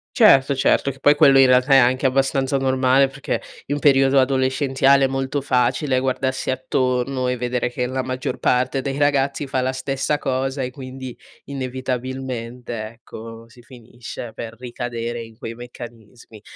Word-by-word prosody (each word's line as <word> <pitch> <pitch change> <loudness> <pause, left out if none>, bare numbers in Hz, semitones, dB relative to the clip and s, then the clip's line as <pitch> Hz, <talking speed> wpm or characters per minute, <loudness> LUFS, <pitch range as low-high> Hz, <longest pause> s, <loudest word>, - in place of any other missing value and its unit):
Certo, 135 +1 +5
certo, 135 +1 +2
che 135 - -10
poi 145 +1 +5
quello 135 -2 +6
in 135 - +7
realtà 130 +2 +3
è - - +8
anche 130 +2 +3
abbastanza 135 +1 +1
normale 130 0 +3
perché 135 +1 -4 0.3
in 145 +1 -2
periodo 135 -1 +4
adolescenziale 135 +1 +2
è - - +5
molto 135 +1 -2
facile 130 +1 +1
guardarsi 130 0 -1
attorno 130 0 -1
e 125 -1 -1
vedere 125 0 -1
che 125 0 -2
la 130 +1 -2
maggior 130 0 -4
parte 130 +1 0
dei 140 0 -3
ragazzi 140 0 +1
fa 130 -1 -1
la 130 +1 0
stessa 135 +2 -2
cosa 135 0 -2
e 125 - -3
quindi 130 -1 -9 0.3
inevitabilmente, 125 -3 -5
ecco, 115 0 -11
si 120 +1 -18
finisce 120 -1 -10
per 115 -1 -7
ricadere 120 -1 -5
in 115 -1 -14
quei 115 - -6
meccanismi. 120 -2 -12
130 Hz, 155 wpm, -21 LUFS, 125-135 Hz, 0.3 s, è